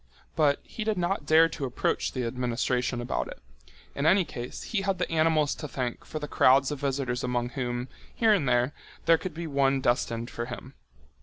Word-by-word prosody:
But 145 -3 +3
he 220 - -6
did 215 -2 0
not 175 -3 -1
dare 160 +1 +7
to 150 -3 -4
approach 125 - -1
the 130 -2 -2
administration 125 0 -1
about 120 - -2
it. - - -9 0.5
In 140 +2 0
any 190 +1 +5
case, 125 -4 -7
he 215 - -1
had 195 -1 0
the 180 - -2
animals 155 -2 +3
to 150 - -6
thank 125 -3 -4
for - - -6
the 150 -1 -4
crowds 135 0 +4
of 145 - -4
visitors 135 -3 -1
among 125 -1 -1
whom, 120 -1 -3 0.3
here 225 -2 +4
and 150 -11 +1
there, 125 +3 +2 0.3
there 165 -1 +5
could 180 -4 -6
be 170 +1 -4
one 140 -2 +2
destined 120 -2 0
for 120 - -4
him. 130 +2 -8
140 Hz, 200 wpm, -28 LUFS, 125-160 Hz, 0.5 s, dare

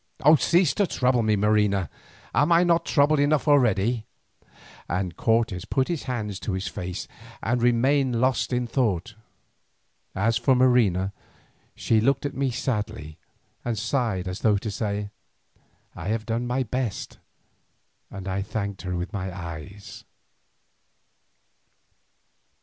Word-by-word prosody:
Cease 175 -2 +3
to 200 - +1
trouble 125 -4 +1
me, 110 -1 +2
Marina, 105 -2 +2 0.5
am 150 +4 +3
I 170 +1 +6
not 170 -1 +2
troubled 145 0 +3
enough 145 +1 +2
already?" 120 -5 +2 0.8
and 90 -1 -2
Cortes 115 -5 +1
put 135 +2 0
his 170 -4 -3
hands 105 -6 -3
to 95 +3 -3
his 95 +1 -3
face 90 -1 -5 0.4
and 120 +2 0
remained 125 +1 +2
lost 130 +1 +1
in 125 0 0
thought. 110 -6 -1 1.0
As 115 +4 +2
for 130 - +3
Marina, 110 -7 +3 0.6
she 110 -2 +2
looked 135 +4 +1
at 140 - -2
me 135 0 0
sadly 110 - -3 0.4
and 120 -2 -2
sighed 115 -6 -1
as 90 +1 -4
though 105 -2 +3
to 105 +2 -4
say, 100 0 -3 0.8
"I 80 - -6
have 110 +1 -1
done 115 +1 -2
my 130 +2 0
best," 125 -3 -4 0.9
and 95 -1 -8
I 95 +1 -1
thanked 100 -2 -4
her 90 0 -3
with 90 +4 -4
my 95 -1 -3
eyes. 90 +2 -9
110 Hz, 135 wpm, -25 LUFS, 100-130 Hz, 1.0 s, I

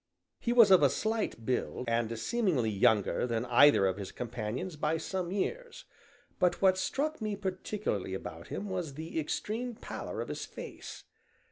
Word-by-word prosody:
He 235 - -1
was 230 -4 +7
of 185 - +8
a 140 - +6
slight 220 - -2
build, 125 0 -2
and 115 0 0
seemingly 145 - +1
younger 105 +3 +2
than 115 0 -1
either 125 -2 +6
of 95 0 +1
his 100 -2 -6
companions 120 +8 -4
by 150 +2 0
some 180 +2 -3
years, 475 - -3 0.5
but 175 -2 +2
what 190 -1 +4
struck 305 +6 -1
me 215 -1 -1
particularly 190 - -3
about 85 -3 -7
him 205 - -4
was 180 -7 -3
the 160 +2 -4
extreme 225 +10 -3
pallor - - -6
of - - -4
his - - -4
face. - - -9
165 Hz, 160 wpm, -31 LUFS, -, 0.5 s, of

